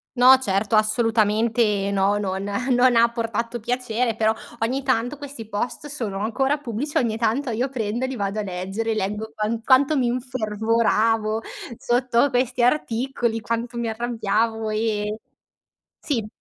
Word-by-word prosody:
No 255 +1 +8
certo 200 -3 0
assolutamente 215 -1 +2
no 200 +1 +2
non 190 -1 -2 0.3
non 245 0 +4
ha 230 0 +6
portato 230 0 -3
piacere, 240 0 -1
però 220 0 +2 0.3
ogni 260 +4 0
tanto 255 +1 0
questi 280 -6 -8
post 225 +7 -4
sono 235 -10 -4
ancora 265 +7 0
pubblici, 280 +2 -3
ogni 230 -3 +1
tanto 235 +4 0
io 245 +4 -1
prendo 235 0 -2
e - - -2
li 265 - -4
vado 200 -1 -2
a - - 0
leggere, 195 +4 -3
leggo 210 +2 -3
quant 220 +2 -2
quanto 275 +4 +4
mi 250 -3 +2
infervoravo 225 -2 0 0.4
sotto 245 +2 +2
questi 250 0 +1
articoli 240 -3 0
quanto 230 +2 -3
mi 235 -1 -2
arrabbiavo 225 -1 -1
e 215 0 -1 0.8
sì. 235 -8 -2
230 Hz, 145 wpm, -23 LUFS, 215-250 Hz, 0.8 s, No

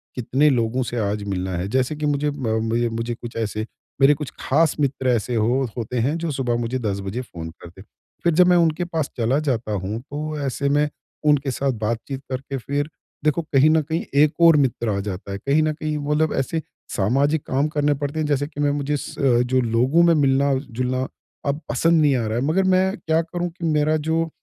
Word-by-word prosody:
कितने 130 +5 +2
लोगों 125 0 +1
से 120 - -4
आज 105 0 -3
मिलना 95 -2 -3
है। 90 +2 -2
जैसे 130 +6 0
कि 150 0 -3
मुझे 145 0 +1
म 135 -6 -4 0.2
मए 120 0 +2
मुझे 115 +1 -3
कुछ 120 -1 -9
ऐसे 110 -1 -2 0.4
मेरे 135 +2 +7
कुछ 150 -1 -5
खास 155 +3 +2
मित्र, 135 -2 0
ऐसे 120 0 0
हो 120 +4 +2
होते 120 +2 -3
हैं 140 +8 +1
जो 165 -2 -2
सुबह 125 -3 -1
मुझे 120 +2 -2
10 100 -4 -2
बजे 100 +6 -4
फ़ोन 85 -9 -8
करते। 85 +2 -12 0.4
फिर 170 -2 +3
जब 180 +2 +5
मैं 180 -1 +5
उनके 165 0 +2
पास 160 -4 -2
चला 120 +4 +2
जाता 125 -7 -1
हूँ, 100 +3 -2
तो 150 +3 -5
ऐसे 140 +1 -1
में 145 +1 +2 0.4
उनके 145 -2 +3
साथ 135 +1 0
बातचीत 120 +5 -3
करके 135 +1 -3
फिर 145 +4 -2 0.3
देखो 155 +2 +2
कहीं 150 -1 +3
न 160 0 +4
कहीं 160 +3 -2 0.2
एक 155 +1 +2
और 165 -2 +8
मित्र 125 -4 +1
आ 100 -1 0
जाता 100 0 -5
है। 100 - -3
कहीं 140 +8 +2
न 155 - +1
कहीं 155 0 -3
मतलब 150 +2 0
ऐसे 160 +4 -1 0.3
सामाजिक 140 +9 +1
काम 135 +3 +1
करने 150 -1 +1
पड़ते 145 +2 -3
हैं, 155 - 0
जैसे 145 -1 0
कि 145 -1 -11
मैं 145 0 +3
मुझे 145 0 -1
अ, - - +1 0.4
जो 130 +1 +1
लोगों 125 +8 +3
में 170 0 +5
मिलना-जुलना 135 -2 +1 0.4
अब 145 +3 -1
पसंद 165 +7 +3
नहीं 145 -3 +4
आ 120 - 0
रहा 110 +2 -1
है। 125 - 0
मगर 180 +5 +2
मैं 190 +1 +2
क्या 160 -1 +1
करूँ 175 +1 -3
कि 170 0 -7
मेरा 155 0 +2
जो 160 +2 0
140 Hz, 215 wpm, -22 LUFS, 120-155 Hz, 0.4 s, और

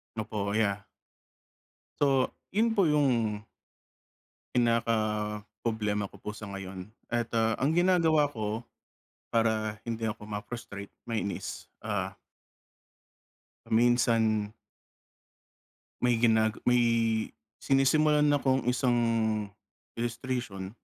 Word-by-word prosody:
Opo 105 -2 -3
kaya. 100 -3 +1 1.1
So 135 -3 +3 0.2
yun 225 +2 +2
po 195 - +5
yung, 125 -9 +2 1.1
pinaka 115 -1 +2 0.7
problema 105 -3 -1
ko - - -15
po 105 - -6
sa 105 -2 -8
ngayon. 95 0 -7 0.2
At 120 -1 -1
ah, 115 0 +3
ang 140 +3 +3
ginagawa 165 -3 +4
ko 110 -1 -3 0.7
para 110 -2 +1
hindi 115 -1 -3
ako 105 -1 -5
ma-frustrate, 105 -1 -6 0.2
mainis 110 -3 -3 0.2
ah - - -2 1.5
minsan 115 -2 +2 1.5
may 125 0 +3
ginag 110 -2 +4
may 125 0 +3 0.8
sinisimulan 150 +2 +3
akong 135 -2 +2
isang 125 -1 +2 1.0
illustration. 120 -5 -3
115 Hz, 90 wpm, -29 LUFS, 105-130 Hz, 1.5 s, po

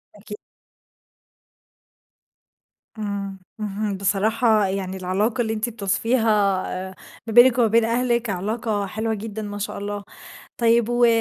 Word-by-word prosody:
أكي 210 0 -9 2.6
إمم، 200 -2 -4 0.2
اهم، 205 -1 -3
بصراحة 215 +3 +2
يعني 190 0 -3
العلاقة 200 +7 0
اللي 220 -1 -1
أنتِ 220 +2 -2
بتوصِفيها 225 +2 0 0.6
آآ 190 - -13 0.3
ما 225 - -3
بينِك 240 +1 +7
وما 240 -2 +4
بين 225 +1 +3
أهلِك 235 0 0
علاقة 205 +2 -2
حلوة 220 +3 -2
جدًا 220 0 -5
ما 205 -1 -5
شاء 205 - -4
الله. 205 0 -4 0.5
طيب 235 -1 +3
و 240 0 +3
215 Hz, 125 wpm, -23 LUFS, 200-230 Hz, 2.6 s, بينِك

